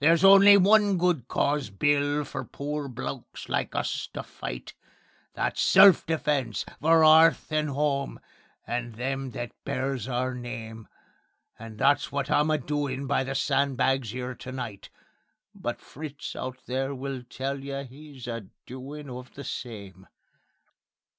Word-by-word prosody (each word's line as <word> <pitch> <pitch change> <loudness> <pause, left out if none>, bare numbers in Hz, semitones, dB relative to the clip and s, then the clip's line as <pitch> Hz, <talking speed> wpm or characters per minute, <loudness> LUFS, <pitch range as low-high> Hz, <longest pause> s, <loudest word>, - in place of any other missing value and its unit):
There's 165 +4 +5
only 195 +1 +9
one 205 0 +5
good 170 -8 +1
cause, 140 -2 0
Bill, 145 +7 +1
for 135 0 -5
poor 145 +3 -5
blokes 125 - -7
like - - -2
us - - -2
to - - -4
fight: - - -7 0.6
That's - - -1
self 190 -3 +7
defence, 150 -5 -1 0.2
for 160 +1 +5
'earth 160 +1 +6
and 155 -1 +1
'ome, 140 -1 -1 0.5
and 120 -1 -4
them 135 +2 -3
that 120 0 -4
bears 130 -3 -2
our 130 0 -1
name; 115 -3 -7 0.7
And 115 -1 -9
that's 140 +4 +2
wot 140 -1 -2
I'm 150 +1 +3
a 155 - +3
doin' 140 -1 -2
by 135 - +1
the 135 +1 -4
sandbags 135 -4 +1
'ere 125 0 -4
to 130 - -9
night.... 120 -6 -6 0.6
But - - -4
Fritz 150 0 -8
out 130 0 -5
there 135 +2 -2
will 135 0 -5
tell 135 +2 -5
you 140 0 -4
'e's 140 -1 -11
a 115 -4 -5 0.2
doin' 140 +4 -8
of 125 0 -9
the 140 - -7
same. 100 -8 -7
135 Hz, 145 wpm, -27 LUFS, 125-150 Hz, 0.7 s, only